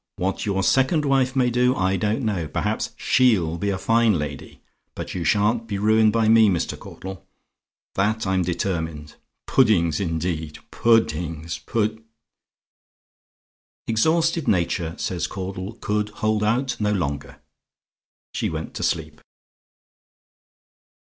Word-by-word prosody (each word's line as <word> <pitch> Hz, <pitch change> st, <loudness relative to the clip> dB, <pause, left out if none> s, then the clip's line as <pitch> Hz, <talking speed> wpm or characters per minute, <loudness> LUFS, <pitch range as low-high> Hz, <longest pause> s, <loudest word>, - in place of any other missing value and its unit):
What 95 Hz, +3 st, -2 dB
your 95 Hz, -1 st, 0 dB
second 135 Hz, -, +2 dB
wife 135 Hz, -2 st, +2 dB
may 125 Hz, -2 st, +2 dB
do 125 Hz, +1 st, +2 dB
I 95 Hz, 0 st, +1 dB
don't 105 Hz, +6 st, -1 dB
know; 95 Hz, -7 st, -1 dB
perhaps -, -, -2 dB
SHE'LL 95 Hz, -11 st, +2 dB
be 100 Hz, -, -1 dB
a 95 Hz, -, -1 dB
fine 115 Hz, 0 st, +3 dB
lady; 75 Hz, -2 st, -7 dB, 0.3 s
but -, -, -6 dB
you 90 Hz, -, -3 dB
sha'n't 110 Hz, +5 st, +1 dB
be 100 Hz, -3 st, -3 dB
ruined 110 Hz, +1 st, +4 dB
by 115 Hz, 0 st, +2 dB
me, 110 Hz, -1 st, +6 dB
Mr. 90 Hz, -4 st, -1 dB
Caudle; 95 Hz, 0 st, -9 dB, 0.7 s
that 110 Hz, +3 st, 0 dB
I'm 95 Hz, 0 st, +1 dB
determined. 80 Hz, -4 st, -3 dB, 0.3 s
Puddings, 90 Hz, -, +3 dB
indeed! 80 Hz, -3 st, -3 dB
Pu 115 Hz, -1 st, +4 dB
dding 80 Hz, -3 st, -5 dB
s! 85 Hz, -, -5 dB
Pud 110 Hz, -1 st, -2 dB, 0.8 s
" -, -, -64 dB
"Exhausted 160 Hz, +7 st, +1 dB
nature," 85 Hz, -3 st, 0 dB
says 90 Hz, -2 st, -2 dB
Caudle, 95 Hz, +1 st, -5 dB
"could 105 Hz, -2 st, -2 dB
hold 110 Hz, 0 st, -1 dB
out 120 Hz, +3 st, 0 dB
no 105 Hz, -1 st, +1 dB
longer. 70 Hz, -8 st, -3 dB, 0.9 s
She -, -, -1 dB
went -, -, -5 dB
to -, -, -5 dB
sleep." -, -, -2 dB
105 Hz, 135 wpm, -23 LUFS, 85-115 Hz, 0.9 s, me